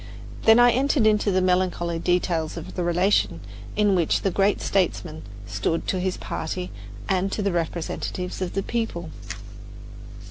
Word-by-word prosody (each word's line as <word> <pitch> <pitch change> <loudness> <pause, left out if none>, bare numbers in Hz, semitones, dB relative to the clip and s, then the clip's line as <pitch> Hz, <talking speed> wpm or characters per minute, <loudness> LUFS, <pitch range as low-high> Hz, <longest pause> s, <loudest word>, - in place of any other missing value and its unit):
Then 225 0 +8
I 245 0 +7
entered 265 -1 +2
into 210 -1 +3
the 185 -1 +2
melancholy 180 -2 +1
details 170 -2 0
of 165 - -7
the 180 - -2
relation 175 +4 +2 0.4
in 210 -2 +3
which 170 -4 +2
the 195 - +2
great 200 +2 +2
statesman 175 -4 -1 0.2
stood 105 +11 -1
to 185 - 0
his 185 0 -1
party 180 +3 -4 0.4
and 190 0 +1
to 210 - -2
the 200 - +1
representatives 175 +2 -3
of 185 - -2
the 195 - -1
people. 200 -9 -3
185 Hz, 150 wpm, -24 LUFS, 170-200 Hz, 0.4 s, Then